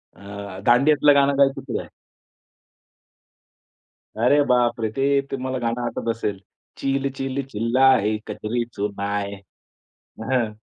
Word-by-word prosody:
अ, 100 -1 -9
दांडियातलं 145 +4 +5
गाणं 140 0 +3
गायचं 135 -1 +3
तेही 120 - -2
आहे. - - -9 2.3
अरे, 125 +7 +3
बापरे! 120 -3 +2
ते 140 +1 +2
तुम्हाला 130 -1 -3
गाणं 120 0 -2
आठवत 120 - -3
असेल. 105 -4 -3 0.4
चिल 135 0 -1
चिल 135 +1 -2
चिल्लाए 115 -1 +3
कजरी 120 +3 -2
सुनाए 100 0 -3
अ, 100 +3 -18
हं, 120 -5 +1
120 Hz, 110 wpm, -22 LUFS, 105-135 Hz, 2.3 s, दांडियातलं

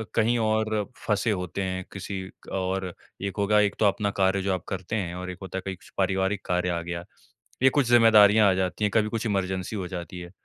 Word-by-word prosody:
कहीं 115 +2 +3
और 110 -1 +1 0.2
फँसे 105 +2 +1
होते 90 -1 -3
हैं, 95 0 -3
किसी 95 0 -5 0.3
और 95 -1 -2 0.3
एक 100 0 -4
होगा 105 +1 +3
एक 105 -1 +2
तो 110 - +3
अपना 100 +1 +2
कार्य 95 0 +3
जो 95 0 0
आप 90 - -3
करते 95 +2 -4
हैं 90 -5 -2
और 90 0 -5
एक 90 - -9
होता 95 -1 -6
है - - -2
कहीं 95 -1 -3 0.2
पारिवारिक 95 +1 0
कार्य 90 0 0
आ 85 -1 -1
गया। 85 0 -5 0.6
ये 130 - +8
कुछ 140 -2 +1
जिम्मेदारियाँ 110 -3 +7
आ - - +4
जाती 95 +2 -1
हैं, 105 - +2
कभी 105 +1 +2
कुछ 115 +1 -3
इमरजेंसी 95 -1 -1
हो 95 -3 -3
जाती 90 0 -6
है। 85 0 -9
95 Hz, 220 wpm, -26 LUFS, 95-105 Hz, 0.6 s, ये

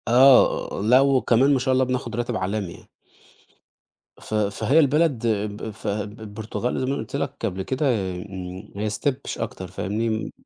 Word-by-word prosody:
آه. 125 -3 +5
لا، 125 +5 +6
وكمان 135 0 +3
ما 135 - +2
شاء 130 +1 +1
الله، 130 0 +3
بناخد 125 -3 -3
راتب 120 0 -2
عالمي 95 -1 -2
يعني. - - -17 1.3
ف - - -8
فهي 105 +7 +2
البلد 145 -5 +2
ب 105 0 -2
ف - - -9
ب 105 +2 -3
البرتغال 110 +3 -4
زي 130 - -1
ما 130 - -1
أنا 140 - -1
قُلت 110 +4 -6
لك 140 0 -2
قبل 95 -3 -2
كده، 130 +8 -1 0.3
إمم، 95 +1 -8
هي 105 +1 -2
step 140 +6 0
مش - - -4
أكتر، 95 - -5
فاهمني؟ 105 +5 -2
م 110 0 -2
110 Hz, 180 wpm, -24 LUFS, 105-130 Hz, 1.3 s, لا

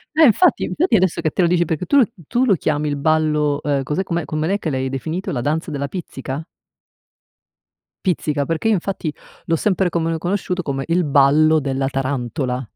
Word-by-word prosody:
Eh 320 - +6
infatti 300 - +4
infatti 330 -7 +1
adesso 185 -4 +2
che 155 -2 0
te - - 0
lo 175 - +4
dici 175 0 +2
perché 160 +2 -3
tu 285 - +3
l 255 -6 +5 0.2
tu 245 +2 +1
lo 215 - +4
chiami 150 -2 0
"Il 145 -1 -1
ballo", 150 -1 +1
ehm, 140 -2 0
cos'è 150 +8 -2
com'è 170 -3 -2
come 155 0 -2
l'è 200 +3 0
che 165 - -3
l'hai 130 -2 -1
definito? 160 +7 -4
La 125 - -2
danza 155 +5 -1
della 140 -1 -3
pizzica? 145 -3 -6 1.6
Pizzica, 150 -5 0
perché 165 +6 -1
io 225 - +4
infatti 180 -5 -2 0.3
l'ho 165 - +1
sempre 190 +2 +1
come 165 -1 -1
conosciuto 180 +1 -2
come 135 -4 -3
"Il 170 +1 +1
ballo 150 +3 +4
della 135 -1 -1
tarantola". 130 -1 -2
155 Hz, 195 wpm, -20 LUFS, 140-180 Hz, 1.6 s, Eh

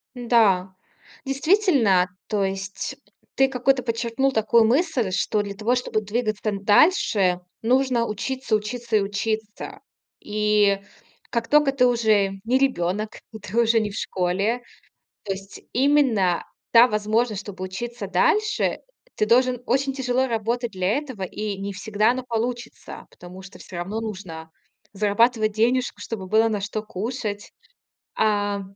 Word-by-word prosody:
Да, 215 -7 +2 0.5
действительно, 275 - +3 0.2
то 205 -2 0
есть 195 0 -4 0.4
ты 270 - +4
какую-то 265 0 +1
подчеркнул 235 +3 -1
такую 220 0 +4
мысль, 260 - +1
что 205 +2 0
для 200 -1 -5
того, 220 +5 +1
чтобы 245 -3 -1
двигаться 215 0 -2
н 200 -1 -4
дальше, 205 - +4 0.2
нужно 250 0 +2
учиться, 240 +2 -2
учиться 225 +1 -1
и - - +3
учиться. 210 +2 -4 0.4
И 210 -1 +2 0.5
как 230 -1 -2
тока 295 -2 +4
ты 260 -2 +3
уже 215 -5 +2
не 245 +3 +2
ребенок, 215 -5 -1
и 220 - -9
ты 210 +2 -7
уже 230 0 +3
не 215 -1 -1
в 200 - -9
школе, 195 +6 -1 0.6
то 200 - -8
есть 195 +1 -9
именно 250 -10 +2 0.3
та 235 +1 +8
возможность, 215 0 0
чтобы 195 -2 -9
учиться 210 +3 -6
дальше, 425 - +1 0.3
ты 215 - 0
должен 250 +2 +3
очень 270 +2 +1
тяжело 260 -1 0
работать 235 0 -2
для 190 +6 0
этого, 260 -9 -7
и 205 +2 -4
не 200 +1 -4
всегда 210 +2 +1
оно 255 +1 -2
получится, 240 +1 -4
потому 180 +2 -12
что 195 +1 -13
всё 185 - -10
равно 190 +6 -3
нужно 185 -7 -7 0.4
зарабатывать 215 +2 +2
денежку, 245 +4 0
чтобы 205 -5 -6
было 220 +4 +3
на 210 -2 -2
что 215 +2 -4
кушать. 210 0 -5 0.6
А, 205 - +1
220 Hz, 140 wpm, -23 LUFS, 200-245 Hz, 0.6 s, та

